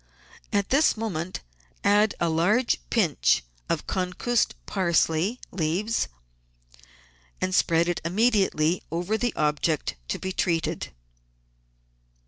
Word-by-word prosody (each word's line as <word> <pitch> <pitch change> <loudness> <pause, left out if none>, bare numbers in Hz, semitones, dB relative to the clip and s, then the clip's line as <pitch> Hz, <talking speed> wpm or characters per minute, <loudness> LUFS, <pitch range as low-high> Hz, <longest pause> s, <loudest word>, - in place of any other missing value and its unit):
At 200 -1 0
this 280 -2 +4
moment 185 -6 -3 0.4
add 205 +1 +4
a 170 - +1
large 180 +10 +2
pinch - - +2 0.3
of - - -1
concussed 190 +6 0
parsley 175 +3 +1
leaves 190 +7 0 1.3
and 185 0 -1
spread 170 -1 +3
it 175 - -1
immediately 185 -4 +2
over 175 +6 -1
the 240 +2 0
object 150 - 0
to - - -2
be 190 - -4
treated. 170 -3 -1
185 Hz, 105 wpm, -26 LUFS, 165-215 Hz, 1.3 s, this